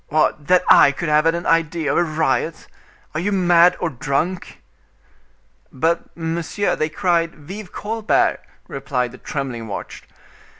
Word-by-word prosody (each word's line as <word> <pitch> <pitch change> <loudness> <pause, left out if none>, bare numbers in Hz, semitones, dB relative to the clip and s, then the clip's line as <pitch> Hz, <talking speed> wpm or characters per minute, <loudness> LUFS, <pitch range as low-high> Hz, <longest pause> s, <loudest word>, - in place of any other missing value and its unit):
What! 150 -1 0
that 180 0 +4
I - - +7
could 155 +3 -4
have 150 +1 +3
had 165 +1 +3
an 170 - -5
idea 165 -1 +1
of - - 0
a - - +3
riot! 160 0 -1 0.5
Are 155 - -2
you 200 +5 -1
mad 175 -2 +4
or 175 - -2
drunk?" 150 +8 -3 1.1
"But, 165 +6 -2
monsieur, 170 +4 -2
they 155 - -1
cried 165 0 0
'Vive 185 +6 -9
Colbert!'" 220 +1 0 0.3
replied 125 -3 -3
the 125 - -13
trembling 130 -6 -5
watch. 100 - -7
165 Hz, 145 wpm, -20 LUFS, 150-175 Hz, 1.1 s, I